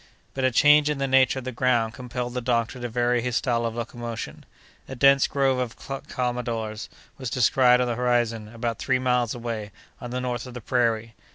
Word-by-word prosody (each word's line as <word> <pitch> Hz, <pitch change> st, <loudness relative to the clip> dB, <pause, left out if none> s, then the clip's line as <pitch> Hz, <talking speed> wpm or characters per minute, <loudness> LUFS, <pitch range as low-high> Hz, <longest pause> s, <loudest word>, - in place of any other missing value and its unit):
But 135 Hz, -, -3 dB
a 130 Hz, -, +4 dB
change 150 Hz, +4 st, +5 dB
in 150 Hz, -, -1 dB
the 135 Hz, 0 st, -1 dB
nature 130 Hz, 0 st, +4 dB
of 130 Hz, -, -5 dB
the 130 Hz, -, -3 dB
ground 120 Hz, -2 st, +1 dB
compelled 125 Hz, -1 st, -5 dB
the 125 Hz, -, -2 dB
doctor 120 Hz, 0 st, -1 dB
to 120 Hz, 0 st, -4 dB
vary 120 Hz, +1 st, +1 dB
his 125 Hz, 0 st, -2 dB
style 120 Hz, -2 st, +1 dB
of 115 Hz, -, -5 dB
locomotion. 120 Hz, -1 st, -6 dB, 0.4 s
A 135 Hz, -, -6 dB
dense 135 Hz, +1 st, +5 dB
grove 135 Hz, -2 st, +1 dB
of 125 Hz, -2 st, -3 dB
calmadores 120 Hz, -4 st, -4 dB, 0.3 s
was 130 Hz, -3 st, -4 dB
descried 125 Hz, +1 st, +4 dB
on 125 Hz, -, +1 dB
the 120 Hz, -, 0 dB
horizon, 120 Hz, -2 st, 0 dB
about 115 Hz, 0 st, -4 dB
three 130 Hz, -1 st, +1 dB
miles 125 Hz, -2 st, 0 dB
away, 115 Hz, -3 st, -5 dB, 0.3 s
on 120 Hz, -, -7 dB
the 125 Hz, +1 st, -3 dB
north 125 Hz, -1 st, -3 dB
of 125 Hz, -, -10 dB
the 125 Hz, -, -6 dB
prairie. 115 Hz, -1 st, 0 dB
125 Hz, 200 wpm, -25 LUFS, 115-130 Hz, 0.4 s, change